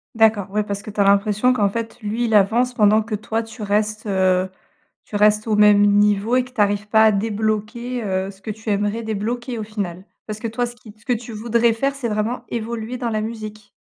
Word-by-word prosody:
D'accord, 215 -3 +3
ouais, 210 0 0
parce 200 0 -5
que 215 - -8
tu 205 0 -1
as - - +6
l'impression 210 +5 +3
qu'en 205 -4 +2
fait 225 +2 -5
lui, 225 +4 -1
il 220 -2 +1
avance 235 +5 +3
pendant 215 0 +4
que 215 0 -4
toi 220 +2 -2
tu 225 -1 -9
restes, 215 +1 -1
heu, 185 -2 +2 0.6
tu 210 - -9
restes 210 +1 +3
au 215 - +2
même 210 -1 +6
niveau 205 +3 +3
et 255 - +3
que 250 - -14
tu 230 -4 -1
arrives 205 +1 +1
pas 220 +1 +5
à 215 - +6
débloquer, 220 +3 -2
heu, 190 -1 -1
ce 195 -1 -13
que 215 - -5
tu 220 +1 -7
aimerais 205 +2 0
débloquer 230 +3 -3
au 215 - -3
final? 195 -4 -5 0.2
Parce 215 0 -4
que 230 - -3
toi, 240 +2 -2
ce 240 - -9
qui 220 -2 -14
t 215 - -30
ce - - -24
que 250 - +1
tu 235 0 -6
voudrais 230 +1 +2
faire, 275 +5 -1
c'est 245 -4 -3
vraiment 220 +3 -2
évoluer 230 +1 -4
dans 240 -2 -2
la 215 -1 -1
musique? 215 -1 -7
215 Hz, 240 wpm, -21 LUFS, 205-230 Hz, 0.6 s, as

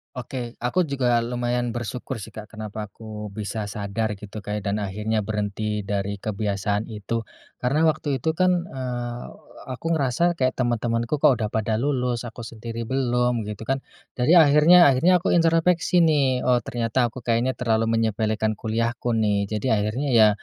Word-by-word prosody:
Oke, 125 -1 -6
aku 125 +10 +1
juga 125 -4 +2
lumayan 120 0 -1
bersyukur 120 +2 -5
sih, 100 - -9
Kak. 110 -1 -9
Kenapa 110 -1 -6
aku 105 0 -8
bisa 105 +2 -4
sadar 105 0 -3
gitu, 105 +1 -8
Kak, 105 +1 -3
ya, - - -5
dan 105 +1 -1
akhirnya 105 +2 -1
berhenti 105 0 -3
dari 100 0 -2
kebiasaan 100 0 -1
itu? 110 +2 -3 0.4
Karena 150 +6 +2
waktu 150 -3 0
itu 160 +6 -1
kan, 180 0 +2
eee, 125 -4 -5 0.5
aku 130 +5 -6
ngerasa 160 +4 +1
kayak 130 -4 0
temen-temenku 120 0 0
kok 150 - +7
udah 110 - -1
pada 110 0 -1
lulus, 125 -2 -1
aku 120 +1 -8
sendiri 115 +1 -6
belum 125 -3 +1
gitu 105 +1 -6
kan. 135 +4 -1 0.4
Jadi 130 +8 +4
akhirnya 160 +1 +7
akhirnya 170 +7 +3
aku - - +1
introspeksi 165 +1 +3
nih. 140 -6 +2
Oh, 125 -1 +3
ternyata 120 +1 0
aku 120 +1 -8
kayaknya 120 +3 +1
terlalu 115 -2 +1
menyepelekan 110 -1 0
kuliahku 115 +2 -1
nih. 105 -2 +1
Jadi 110 +4 -3
akhirnya 110 +7 0
ya, 110 -3 +7
115 Hz, 160 wpm, -24 LUFS, 110-130 Hz, 0.5 s, kok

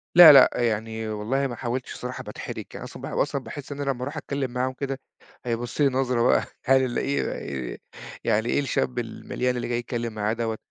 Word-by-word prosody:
لأ، 175 -3 +12
لأ، 135 -2 +9
يعني 110 -1 -1
والله 115 +6 0
ما 120 - -5
حاولتش 125 +1 -3
الصراحة 125 +1 -6
باتحرِج - - -6
يعني - - -7
أصلًا - - -10
باح - - -5
أصلًا - - 0
باحس 145 0 -8
إن 145 0 -4
لمّا 135 -3 -1
ارُوح 140 +4 -5
أتكلّم 140 -3 -3
معاهم 130 +1 -1
كده، 135 0 -4 0.5
هيبُصّ 120 +3 -2
لي 145 - +6
نظرة 130 -2 +1
بقى، 120 - +4 0.2
هل 135 0 +5
ال 125 -2 -1
إيه 140 - 0 0.4
وار - - -6 0.5
يعني 110 +3 +1
إيه - - +2
الشاب 130 -3 0
المليان 125 +2 -2
اللي 120 - -3
جاي 120 0 0
يتكلّم 120 -1 -3
معايا 105 0 0
دَوَّة، 115 -1 -2
125 Hz, 200 wpm, -25 LUFS, 115-135 Hz, 0.5 s, لأ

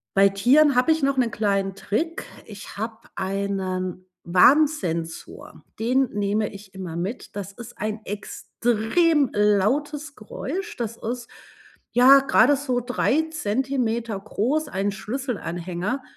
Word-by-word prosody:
Bei 195 0 +6
Tieren 260 +9 +4
habe 250 +5 +4
ich 315 -2 +1
noch 275 0 +2
'nen 245 -3 +2
kleinen 195 -2 0
Trick, 320 - -2 0.2
ich 205 -2 -10
habe 220 +1 -4 0.2
einen 190 -2 -3 0.2
Warnsensor, 180 - +1 0.2
den 255 +3 +2
nehme 205 +1 0
ich 200 -1 -13
immer 185 -4 -6
mit. 190 +9 -5
Das 200 -2 -5
ist 230 +2 -11
ein 215 +1 -3
extrem 240 - 0
lautes 275 +9 +1
Geräusch, 365 - -6
das 230 -1 -4
ist, 240 +1 -5 0.6
ja, 260 +3 +7
grade 270 0 +4
so 260 -3 -1
3 250 +5 +1
Zentimeter 235 -4 -1
groß, 250 +9 -1
einen 200 -1 -1
Schlüsselanhänger, 200 - -4
220 Hz, 120 wpm, -24 LUFS, 195-270 Hz, 0.6 s, ja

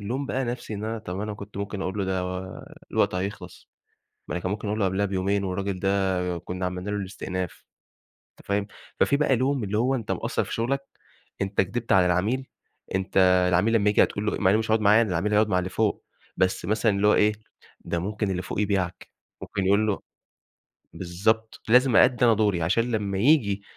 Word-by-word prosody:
الوم 125 +7 -3
بقى 135 -1 -1
نفْسي 120 -2 -5
إن 105 - -5
أنا 115 +1 -3
طَب 95 -2 -6
أنا 105 0 -4
كنت 100 0 -11
ممكن 100 -1 -4
أقول 95 +2 -3
له 100 - 0
ده 95 -1 -1
و 90 0 -6 0.3
الوقت - - +2
هيخلص، 100 +3 -6 0.6
يعني 90 - -3
كان 95 - -3
ممكن 105 +1 -3
أقول 105 +1 -2
له - - +2
قبلها 95 +2 +1
بيومين 100 +1 0
والراجل 95 0 -3
ده 95 -3 0
كنا 90 +2 -4
عملنا 90 +2 -4
له 105 - -1
الاستئناف، 95 -2 -5 0.7
أنت - - -21
فاهم؟ 100 0 0 0.3
ففي 140 - +4
بقى 140 -3 +2
لوم 130 0 0
اللي 105 +2 -1
هو 130 +3 +2
أنت 120 -5 -2
مقصّر - - -1
في - - -6
شغلك، 135 +4 -1 0.6
أنت 95 +1 0
كدبت 110 +5 -3
على 90 -2 +5
العميل، 105 +10 0 0.5
أنت 95 0 -4 0.3
العميل 95 +6 +2
لما 105 -2 +3
ييجي 105 - +4
هتقول 105 +1 -1
له 105 - 0
إي - - -3
مع 95 - +3
إنه 105 - +4
مش 110 0 -2
هيقعد 110 0 +3
معايا 105 +3 +6
أنا، 105 - -2
العميل 95 +5 0
هيقعد 105 +1 +4
مع 95 - +2
اللي 90 +1 -2
فوق، 110 -2 -1 0.3
بس 95 -1 0
مثلًا 110 +3 +1
اللي 100 +1 +2
هو - - +5
إيه، 105 +1 +4 0.5
ده 85 - -3
ممكن 105 +2 -2
اللي 90 -1 -2
فوق 95 - -4
يبيعك، 95 -3 -1 0.3
ممكن 95 -1 -3
يقول 100 +2 +3
له 105 -2 -1 0.9
بالضبط 110 +6 -1
لازم 125 +1 +5
أأدي 125 -1 +5
أنا 115 -2 +6
دوري، 105 -5 +1
عشان 115 +9 +1
لما 100 -3 -1
ييجي 105 -5 +3
100 Hz, 205 wpm, -25 LUFS, 95-110 Hz, 0.9 s, معايا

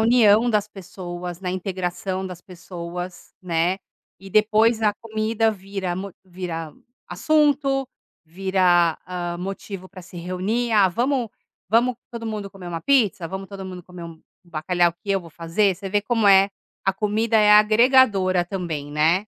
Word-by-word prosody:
união 225 0 +5
das 210 -2 +1
pessoas, 180 -3 -8
na 185 - -4
integração 185 0 -3
das 180 -2 -8
pessoas, 175 -1 -8
né, 175 +1 0 0.4
e 195 - -12
depois 220 +2 +3
a 210 -1 +3
comida 225 0 -1
vira 195 -2 -4
mo 195 +2 -5
vira 175 -4 -6 0.3
assunto, 285 -3 +1 0.4
vira, 175 -1 +2
hã, 175 -1 -4
motivo 190 0 -6
para 185 -1 -12
se 175 - -13
reunir: 190 +7 -2
"Ah, 200 -3 +5
vamos 245 +5 0 0.4
vamos 235 +3 +3 0.2
todo 230 -1 -6
mundo 210 -2 -4
comer 195 -3 -11
uma 165 -1 -4
pizza, 210 -9 +2
vamos 190 +1 -6
todo 195 -1 -8
mundo 185 -1 -7
comer 180 0 -11
um 165 -1 -10 0.2
bacalhau 175 +1 +1
que 200 +4 -8
eu 195 - +1
vou 165 -2 -13
fazer", 170 +5 +1
você 195 +1 -6
vê 205 +1 +1
como 225 -1 +1
é, 195 0 +6 0.3
a 195 - +2
comida 215 +3 0
é 210 -1 +5
agregadora 210 -4 +5
também, 170 -6 -4
né. 165 +6 +2
190 Hz, 155 wpm, -23 LUFS, 175-215 Hz, 0.4 s, é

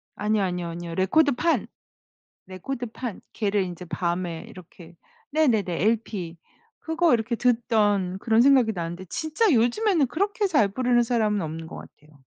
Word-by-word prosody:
아니요, 210 0 0
아니요, 180 -2 -2
아니요. 170 0 -6
레코드판. 285 - +2 0.8
레코드판. 235 +3 -6
걔를 205 -2 0
이제 180 0 -7
밤에 175 -1 -3
이렇게 175 -1 -14 0.4
네네네 220 - +1
LP. 210 -6 -1 0.4
그거 320 -2 +2
이렇게 235 +1 -1
듣던 210 -6 +1
그런 225 +2 +3
생각이 260 -4 +5
나는데 175 0 -5
진짜 315 - 0
요즘에는 290 - +2
그렇게 405 - 0
잘 255 - +3
부르는 245 +3 +2
사람은 220 -3 +1
없는 160 +1 -6
것 - - -9
같아요. 150 -2 -15
215 Hz, 330 characters per minute, -25 LUFS, 180-255 Hz, 0.8 s, 생각이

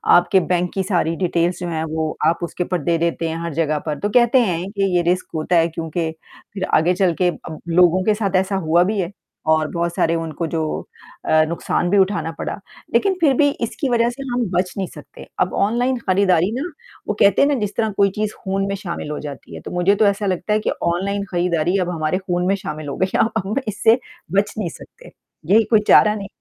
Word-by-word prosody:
आपके 180 +2 +4
बैंक 180 0 0
की 195 - -1
सारी 175 -3 0
डिटेल्स 175 0 0
जो 180 - -4
हैं 160 -1 -2
वो 160 -1 -2
आप 165 - +2
उसके 175 +1 -3
ऊपर 180 -2 -2
दे 170 -1 +1
देते 165 0 -1
हैं 160 - -3
हर 170 -2 -4
जगह 155 -1 0
पर, 150 -1 -3
तो 205 - -1
कहते 240 +3 +4
हैं 180 0 -2
कि 195 -3 0
ये 175 - +4
रिस्क 180 0 -2
होता 160 +3 0
है 165 0 +4
क्योंकि 165 0 -3 0.4
फिर 195 -2 -4
आगे 165 +3 +4
चल 180 -2 +2
के 180 - +4
अब 160 -2 -7
लोगों 180 +2 +4
के 215 +2 +3
साथ 200 -3 -1
ऐसा 190 +1 +1
हुआ 170 -1 +3
भी 205 +2 -1
है 175 0 -2 0.4
और 155 -1 +1
बहुत 170 0 -1
सारे 165 0 +2
उनको 165 0 -3
जो 160 0 -2 0.6
अ, 155 0 +4
नुकसान 170 +1 -1
भी 200 - +3
उठाना 190 -3 +1
पड़ा, - - -3 0.4
लेकिन 395 -1 +3
फिर 290 -5 +5
भी 285 -1 +4
इसकी 240 +4 -2
वजह 235 -1 +2
से 245 +3 -7
हम 245 -1 0
बच 180 0 0
नहीं 190 - -2
सकते। - - -13
अब - - +1
ऑनलाइन 245 +5 +1
खरीदारी 185 -1 +3
ना, 285 - -2 0.4
वो 210 - 0
कहते 200 -1 +5
हैं 280 - +5
ना 290 - +2
जिस 210 -1 -3
तरह 220 -2 +1
कोई 200 0 +4
चीज़ 215 0 -2
खून 195 0 -1
में 200 - -2
शामिल 175 -6 -5
हो 150 - -4
जाती 145 -3 -8
है, - - -8
तो - - -8
मुझे 180 +3 +2
तो 210 - +3
ऐसा 200 +1 +1
लगता 185 +2 -1
है 215 - +3
कि 215 - -1
ऑनलाइन 195 +4 0
खरीदारी 175 0 +1
अब 180 - -1
हमारे 165 0 -1
खून 180 -2 -2
में 195 - +3
शामिल 155 -5 -6
हो 140 - -5
गई 185 - +1
है - - +4
अब 205 +8 -1
इससे 225 +4 +3 0.4
बच 205 - -2
नहीं 200 -6 -2
सकते। - - -14 0.4
यही 225 +1 +6
कोई 220 - +6
चारा 210 0 +6
नहीं 200 -2 -6
185 Hz, 230 wpm, -20 LUFS, 170-205 Hz, 0.6 s, यही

